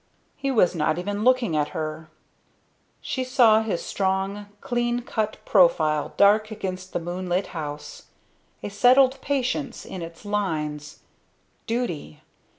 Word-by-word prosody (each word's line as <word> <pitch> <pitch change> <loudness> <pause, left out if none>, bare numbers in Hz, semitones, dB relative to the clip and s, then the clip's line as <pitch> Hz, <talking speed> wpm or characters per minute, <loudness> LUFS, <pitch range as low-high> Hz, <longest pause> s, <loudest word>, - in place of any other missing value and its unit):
He 275 - -3
was 215 -10 +3
not 155 -1 0
even 205 +3 -3
looking 250 -8 +3
at 150 -1 +1
her; 155 0 -5 0.9
she 260 - -3
saw 235 -4 +5
his 220 -6 -3
strong, 195 +1 -1
clean 240 +1 -1
cut 215 -2 -2
profile 155 -6 +3
dark 210 +2 +5
against 185 -3 -6
the - - 0
moonlit 180 +2 -2
house, 155 - -7 0.6
a - - -3
settled 255 +5 +4
patience 275 -1 -2
in 185 - -7
its 165 +4 -9
lines. 155 -8 -3 0.7
Duty! 175 - -3
200 Hz, 125 wpm, -24 LUFS, 165-240 Hz, 0.9 s, saw